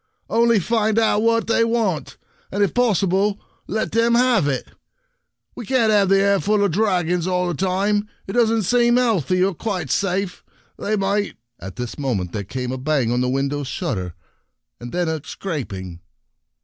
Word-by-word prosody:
" -, -, -51 dB
Only 235 Hz, -1 st, +4 dB
find 220 Hz, +2 st, 0 dB
out 220 Hz, -2 st, +3 dB
what 230 Hz, 0 st, +2 dB
they 230 Hz, 0 st, +2 dB
want, 225 Hz, -, -1 dB, 0.3 s
and 200 Hz, +2 st, +1 dB
if 200 Hz, -, 0 dB
possible, 200 Hz, -3 st, +1 dB, 0.3 s
let 220 Hz, 0 st, -2 dB
them 230 Hz, +1 st, +3 dB
have 245 Hz, -, +3 dB
it. 135 Hz, -3 st, -2 dB, 0.9 s
We 245 Hz, -, -6 dB
can't 230 Hz, -1 st, +2 dB
have 200 Hz, -2 st, +3 dB
the 195 Hz, 0 st, +5 dB
air 200 Hz, 0 st, +3 dB
full 210 Hz, +1 st, +1 dB
of 200 Hz, -, 0 dB
dragons 180 Hz, -3 st, +1 dB
all 180 Hz, -1 st, 0 dB
the 175 Hz, -, -1 dB
time. 195 Hz, +4 st, 0 dB, 0.2 s
It 195 Hz, -, -6 dB
doesn't 225 Hz, -2 st, +2 dB
seem 240 Hz, +4 st, +3 dB
healthy, 185 Hz, -, +2 dB
or 195 Hz, 0 st, +1 dB
quite 180 Hz, -, -3 dB
safe. 195 Hz, -1 st, -1 dB, 0.4 s
They 215 Hz, -, -1 dB
might 200 Hz, +1 st, -1 dB
— 120 Hz, -, -57 dB
" -, -, -50 dB
At 95 Hz, 0 st, -8 dB
this 125 Hz, +1 st, -6 dB
moment 105 Hz, -11 st, -2 dB
there 100 Hz, +1 st, -4 dB
came 125 Hz, +5 st, -4 dB
a 130 Hz, -, -4 dB
bang 135 Hz, -4 st, 0 dB
on 120 Hz, +1 st, +1 dB
the 125 Hz, -, 0 dB
window 140 Hz, +2 st, -1 dB
shutter, 100 Hz, -, -4 dB, 0.6 s
and 120 Hz, -, -8 dB
then 175 Hz, -1 st, -1 dB
a 160 Hz, -1 st, -2 dB
scraping. 100 Hz, -, -6 dB
195 Hz, 185 wpm, -21 LUFS, 145-220 Hz, 0.9 s, the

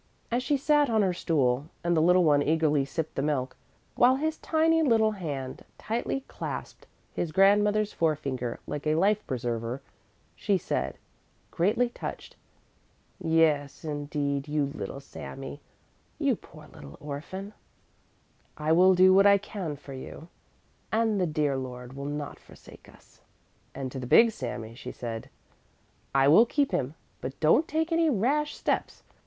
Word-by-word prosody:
As 240 Hz, +2 st, +1 dB
she 285 Hz, +3 st, +1 dB
sat 295 Hz, 0 st, +3 dB
on 220 Hz, -2 st, +3 dB
her 185 Hz, -2 st, +1 dB
stool, 140 Hz, -6 st, 0 dB, 0.2 s
and 175 Hz, 0 st, +2 dB
the 160 Hz, -, +3 dB
little 180 Hz, +2 st, +5 dB
one 145 Hz, -3 st, +4 dB
eagerly 150 Hz, -2 st, +2 dB
sipped 160 Hz, +3 st, -4 dB
the -, -, -2 dB
milk, 135 Hz, -3 st, -1 dB, 0.4 s
while 250 Hz, +2 st, +5 dB
his 315 Hz, +3 st, -1 dB
tiny 325 Hz, 0 st, +2 dB
little 225 Hz, -7 st, +3 dB
hand 145 Hz, -10 st, -5 dB
tightly 240 Hz, +4 st, -2 dB
clasped -, -, -7 dB, 0.3 s
his 170 Hz, -, -2 dB
grandmother's 205 Hz, +3 st, +3 dB
forefinger 140 Hz, -7 st, -1 dB
like 150 Hz, +1 st, -5 dB
a 155 Hz, -, +3 dB
life 205 Hz, +5 st, +2 dB
preserver, 120 Hz, -1 st, -3 dB, 0.6 s
she 200 Hz, -2 st, +1 dB
said, 65 Hz, -, -3 dB, 0.5 s
greatly 215 Hz, +8 st, +2 dB
touched: 240 Hz, -, -7 dB, 0.8 s
"Yes, 160 Hz, -4 st, +1 dB
indeed, 145 Hz, -1 st, -2 dB
you 145 Hz, -2 st, 0 dB
little 135 Hz, -, -6 dB
Sami, 135 Hz, +1 st, -9 dB, 0.6 s
you -, -, +2 dB
poor -, -, -15 dB
little 70 Hz, 0 st, -12 dB
orphan, 170 Hz, +8 st, -7 dB, 1.0 s
I 155 Hz, +1 st, -1 dB
will 185 Hz, +3 st, +6 dB
do 185 Hz, +1 st, +6 dB
what 195 Hz, +1 st, +6 dB
I 200 Hz, 0 st, +7 dB
can 195 Hz, -6 st, -5 dB
for 140 Hz, 0 st, -11 dB
you 145 Hz, +5 st, -9 dB, 0.6 s
and 220 Hz, -2 st, +1 dB
the 180 Hz, -, +2 dB
dear 150 Hz, -3 st, 0 dB
Lord 125 Hz, -1 st, -7 dB
will 140 Hz, +1 st, -6 dB
not 145 Hz, 0 st, -5 dB
forsake -, -, -16 dB
us." -, -, -21 dB, 0.5 s
And 135 Hz, -2 st, -4 dB
to 130 Hz, -, -5 dB
the 125 Hz, -, -6 dB
big 230 Hz, -, +6 dB
Sami 120 Hz, -, -6 dB
she 125 Hz, +1 st, -8 dB
said: 115 Hz, -2 st, -6 dB, 0.9 s
"I 135 Hz, 0 st, +5 dB
will 195 Hz, +11 st, +7 dB
keep 285 Hz, 0 st, +1 dB
him, 150 Hz, -5 st, -1 dB, 0.3 s
but 130 Hz, +2 st, -6 dB
don't 165 Hz, -, +4 dB
take 320 Hz, +2 st, -1 dB
any 330 Hz, -1 st, +3 dB
rash 285 Hz, +6 st, +1 dB
steps! -, -, -2 dB
160 Hz, 150 wpm, -28 LUFS, 140-210 Hz, 1.0 s, I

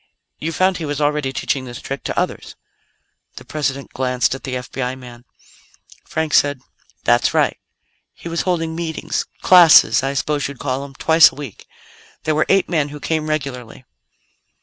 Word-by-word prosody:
"You 160 Hz, -, -3 dB
found 185 Hz, +2 st, +1 dB
he 165 Hz, -, -4 dB
was 145 Hz, -1 st, -3 dB
already 150 Hz, -2 st, 0 dB
teaching 135 Hz, 0 st, -2 dB
this 120 Hz, -1 st, -8 dB
trick 135 Hz, 0 st, -6 dB
to -, -, -1 dB
others." -, -, -4 dB, 0.8 s
The -, -, -11 dB
President 140 Hz, -3 st, -3 dB
glanced 125 Hz, -1 st, 0 dB
at 135 Hz, -, -7 dB
the 130 Hz, -2 st, -3 dB
FBI 125 Hz, 0 st, -4 dB
man. 120 Hz, -1 st, -13 dB, 0.8 s
Frank 160 Hz, -1 st, -2 dB
said: 145 Hz, -2 st, +3 dB, 0.4 s
"That's -, -, +2 dB
right; -, -, +2 dB, 0.6 s
he -, -, -10 dB
was 165 Hz, 0 st, -1 dB
holding 165 Hz, -3 st, -1 dB
meetings 165 Hz, -1 st, -3 dB, 0.2 s
classes, 175 Hz, -4 st, +7 dB
I 135 Hz, +1 st, -2 dB
suppose 145 Hz, +1 st, -1 dB
you'd 140 Hz, -1 st, -9 dB
call 130 Hz, 0 st, -2 dB
them 140 Hz, -1 st, -10 dB
twice 160 Hz, +3 st, +6 dB
a -, -, -16 dB
week. 140 Hz, -8 st, -9 dB, 0.6 s
There 155 Hz, -, 0 dB
were 155 Hz, -, +1 dB
eight 195 Hz, 0 st, +3 dB
men 155 Hz, -4 st, 0 dB
who 150 Hz, +1 st, -9 dB
came 155 Hz, +1 st, -2 dB
regularly." 130 Hz, -5 st, -4 dB
145 Hz, 170 wpm, -19 LUFS, 130-160 Hz, 0.8 s, classes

